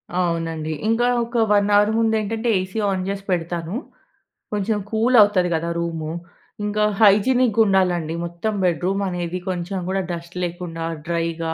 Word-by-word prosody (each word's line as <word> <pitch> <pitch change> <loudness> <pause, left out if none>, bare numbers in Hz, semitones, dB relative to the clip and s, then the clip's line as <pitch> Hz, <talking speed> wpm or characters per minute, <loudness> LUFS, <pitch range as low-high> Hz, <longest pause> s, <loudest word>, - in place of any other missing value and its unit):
అవునండి. 165 -3 -1 0.2
ఇంగ 225 +1 +2 0.2
ఒక 235 +1 -4
1 205 0 +3
అవర్ 205 +1 +5
ముందేంటంటే 220 +1 0
ఏసీ 185 +3 -5
ఆన్ 190 -1 -1
జేసి 195 0 -3
పెడతాను. 170 0 -2 0.8
కొంచెం 210 +1 0
కూల్ 230 +3 +2
అవుతది 195 -4 +3
గదా! 165 +1 -1
రూము. 165 -2 -3 0.5
ఇంకా 210 0 0 0.2
హైజినిగ్గుండాలండి 200 -6 +3
మొత్తం 170 +6 -3
బెడ్‌రూం 180 +3 +1
అనేది. 175 0 -3
కొంచెం 180 +1 -3
గూడా 190 +1 0
డస్ట్ 170 0 -7
లేకుండా 175 -1 -4 0.2
డ్రైగా 165 -1 -2
185 Hz, 130 wpm, -22 LUFS, 170-210 Hz, 0.8 s, అవర్